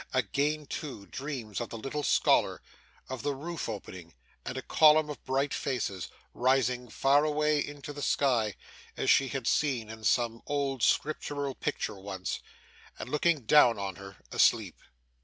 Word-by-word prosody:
Again, 150 +2 0
too, 135 -8 -6
dreams 120 - -5
of 120 - -4
the 115 - -6
little 135 +6 -4
scholar; - - +3 0.5
of 130 -2 -5
the 145 +2 -1
roof 165 0 -5
opening, 90 -6 -8 0.3
and 125 - -5
a 130 - -4
column 155 -1 +5
of 145 - -9
bright 135 +1 0
faces, 100 -8 -2 0.3
rising 125 -1 +1
far 140 +5 +3
away 150 -1 +2
into 145 0 -8
the 145 - -7
sky, 120 -9 +1 0.4
as - - +3
she 135 - +4
had 135 -2 -4
seen 120 -7 +1
in 110 0 -10
some 115 0 +1
old 140 -3 -1
scriptural 145 +1 0
picture 105 -4 -3
once, 95 -1 -4 0.6
and - - -7
looking 150 0 +2
down 120 0 +5
on 100 -2 -4
her, 100 0 -11
asleep. - - +3
135 Hz, 155 wpm, -30 LUFS, 110-145 Hz, 0.6 s, column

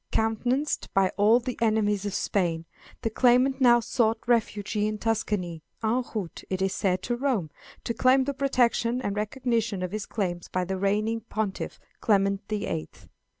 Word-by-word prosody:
Countenanced 245 +6 0
by 195 -1 +4
all 215 +4 +5
the 250 0 -5
enemies 210 -3 +1
of 200 - -4
Spain, 170 -4 0 0.4
the 225 - +1
claimant 255 +3 +3
now 240 -2 +7
sought 230 -1 +1
refuge 225 -4 0
in 210 0 0
Tuscany, 205 -7 -1 0.2
en 235 +4 +1
route, 195 -6 -4
it 185 - -2
is 190 0 0
said, 185 -2 0
to 240 - -1
Rome, 240 - -1 0.3
to 235 - -2
claim 260 +2 +4
the 280 +2 -2
protection 250 -3 +1
and 200 - -2
recognition 225 -2 -1
of 180 - -3
his 215 0 -4
claims 175 -5 -3
by 185 0 -1
the 190 +1 -3
reigning 215 +3 0
Pontiff, 210 -3 -3 0.2
Clement 200 -1 +1
the 215 -1 -2
Eighth. 160 -1 -6
215 Hz, 165 wpm, -27 LUFS, 195-240 Hz, 0.4 s, now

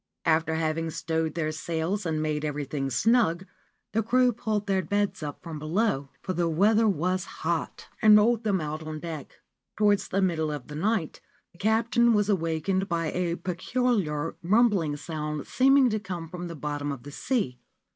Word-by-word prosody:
After 160 -1 +2
having 160 0 -1
stowed 160 0 -2
their 155 -2 -1
sails 165 +5 -2
and 155 -1 -1
made 150 -1 -1
everything 145 -2 -2
snug, 205 - +2 0.5
the 225 - +1
crew 250 +2 +3
pulled 215 -2 -2
their 195 -2 +1
beds 205 +3 -1
up 145 -2 -6
from 160 -3 -6
below 155 -3 0
(for 185 - -2
the 170 -1 0
weather 215 +7 +4
was 185 -1 0 0.2
hot) - - -2
and 215 -1 +8
rolled 225 +2 +3
them 200 -3 +1
out 155 0 -4
on 155 -1 -6
deck. 160 -4 -8 0.4
Towards 205 -2 +3
the 195 - -1
middle 165 -5 +1
of 145 -3 -6
the 150 - -7
night 185 0 -1 0.3
the 175 - -23
captain 230 +2 +3
was 210 0 +2
awakened 185 +1 0
by 165 -2 -1
a 175 -2 -1
peculiar 180 -4 -1
rumbling 190 -6 +2
sound 150 -1 -4
seeming 270 +1 +4
to 215 - 0
come 180 -4 -6
from 175 +1 -6
the 170 - -7
bottom 145 -1 -3
of 140 -4 -7
the 145 - -9
sea. 140 - -1
170 Hz, 175 wpm, -27 LUFS, 155-210 Hz, 0.5 s, and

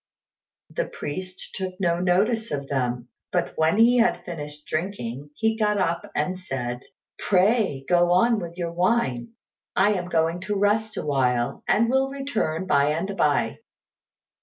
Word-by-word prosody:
The - - -1
priest 185 +5 -7
took 185 0 -5
no 170 -2 +1
notice 210 +6 +1
of 140 -1 -3
them; 125 -3 -2 0.2
but - - -1
when 160 +5 +2
he 235 +2 +6
had 235 0 +2
finished 150 -4 -7
drinking, 145 - -4
he 220 0 +1
got 210 -2 +1
up 170 -3 -1
and 185 +5 -1
said, 125 -8 -4 0.4
"Pray, 190 - +2
go 175 0 +4
on 220 +5 +4
with 170 -2 -7
your 170 -2 -2
wine; 180 - 0 0.4
I 210 +2 +4
am 180 -3 -3
going 165 0 +1
to 205 +2 -2
rest 210 +2 +1
awhile, 125 -4 0
and 230 +2 +3
will 265 +2 +2
return 235 - -2
by 140 -6 +3
and 190 +5 -3
by." - - +1
180 Hz, 150 wpm, -24 LUFS, 150-210 Hz, 0.4 s, he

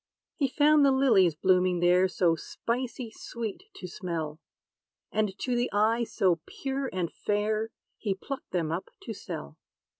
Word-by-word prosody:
He 280 - +1
found 295 +2 +5
the 275 - +6
lilies 220 - +4
blooming 180 +1 +3
there 180 +2 +5
So 175 -2 +2
spicy 235 +6 -4
sweet 230 - -6
to - - -8
smell, 165 -5 -4 0.7
And 210 -2 0
to 250 -1 -1
the 240 +1 +1
eye 225 +3 +3
so 180 -6 +2
pure 270 0 -3
and 180 -3 -2
fair, 215 +1 0 0.3
He 200 -4 -1
plucked 275 +9 -7
them 165 -4 -1
up 170 +3 -3
to 225 - -5
sell. 70 - -7
210 Hz, 150 wpm, -29 LUFS, 180-245 Hz, 0.7 s, the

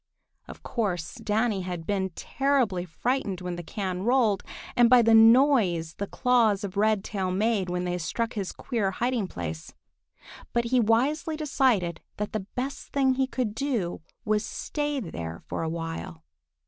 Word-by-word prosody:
Of - - -11
course 190 -9 -2
Danny 215 -1 0
had 180 -2 -5
been 190 -1 0
terribly 255 -10 0
frightened 200 +2 -2
when 180 -1 -4
the 175 - -5
can 185 0 -4
rolled, 225 -3 +2 0.3
and 240 -1 +6
by 250 -1 +7
the 225 0 +4
noise 225 - +5
the 200 - -4
claws 230 -5 +2
of 200 -1 -5
Redtail 205 -2 +1
made 200 0 +1
when 180 0 -1
they 180 0 -2
struck 230 +7 -2
his 200 -4 -3
queer 225 -7 -2
hiding 235 0 -1
place. 80 - -6 0.8
But 235 0 +1
he 250 +2 +2
wisely 270 +8 +1
decided 255 - +1 0.2
that 210 0 -3
the 205 -3 -3
best 265 +2 -4
thing 270 -2 +2
he 265 0 +1
could 250 -5 -2
do 225 - -2 0.2
was 215 0 +2
to - - -7
stay 295 -1 -2
there 85 - -6
for - - -4
a 165 - -1
while. 165 - -5
210 Hz, 160 wpm, -27 LUFS, 180-250 Hz, 0.8 s, by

